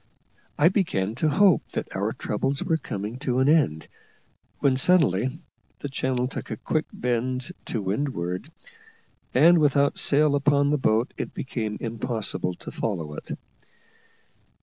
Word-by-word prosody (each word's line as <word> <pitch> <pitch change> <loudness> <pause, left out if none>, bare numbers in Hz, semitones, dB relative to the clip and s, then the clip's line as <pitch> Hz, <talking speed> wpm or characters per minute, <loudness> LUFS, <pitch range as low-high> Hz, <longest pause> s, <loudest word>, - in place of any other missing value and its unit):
I 150 - +5
began 110 - 0
to 155 - +3
hope 190 +2 +5
that - - -4
our - - 0
troubles 135 +6 -2
were 165 -2 +1
coming 105 -3 -5
to 130 -3 -1
an 130 +1 +3
end, 145 - +2 0.7
when 135 -2 +2
suddenly 130 - +3 0.4
the 145 - -4
channel 130 -2 -1
took - - -7
a - - -4
quick 155 -1 -1
bend 125 +4 -2
to 110 - -3
windward, 95 - -2 0.8
and 170 +1 +7
without 145 -1 +2
sail 150 0 +3
upon 145 0 +3
the 150 - +1
boat 115 -1 +1
it - - -5
became 110 -5 -3
impossible 110 -5 -2
to - - -9
follow 85 -9 -3
it. - - -7
130 Hz, 140 wpm, -25 LUFS, 110-145 Hz, 0.8 s, and